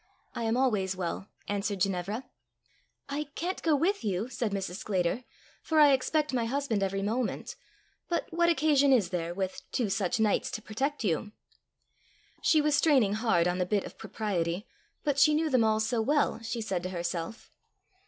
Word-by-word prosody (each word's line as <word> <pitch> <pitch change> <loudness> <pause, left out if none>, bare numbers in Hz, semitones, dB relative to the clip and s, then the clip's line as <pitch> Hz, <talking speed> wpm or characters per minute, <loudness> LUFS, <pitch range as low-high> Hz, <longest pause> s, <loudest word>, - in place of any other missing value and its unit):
"I 235 - -3
am 225 +2 +1
always 210 -8 +1
well," 185 +2 -4 0.2
answered 200 -1 -2
Ginevra. 195 +5 -1 0.8
"I 285 +2 -3
can't 360 +3 -3
go 320 -2 +3
with 355 +6 +1
you," 205 +2 -1
said 240 -4 -2
Mrs. 190 -2 -3
Sclater, 195 +3 -1 0.4
"for 315 -1 +1
I 290 -2 +7
expect 295 +3 +1
my 240 -2 +1
husband 245 -4 -1
every 195 0 -1
moment; 230 +3 -2 0.5
but 345 - 0
what 340 0 +3
occasion 290 -3 +4
is 220 -9 +4
there, 170 -2 -2
with 190 -1 -3
two 225 -6 0
such 195 +1 0
knights 215 -2 +2
to - - -2
protect 270 +6 -2
you?" 205 +2 -1 1.1
She 310 - +4
was 300 0 +2
straining 270 -9 +4
hard 215 -6 +2
on 180 +1 0
the - - +3
bit 205 +1 +1
of - - -10
propriety; 195 -4 -2 0.4
but 285 -2 +1
she 305 +1 +6
knew 315 0 +1
them 255 -3 +4
all 220 0 +2
so 225 +1 0
well! 285 0 +1
she 230 +1 -3
said 190 -5 -2
to 185 - -4
herself. 170 +3 -4
220 Hz, 175 wpm, -29 LUFS, 195-280 Hz, 1.1 s, I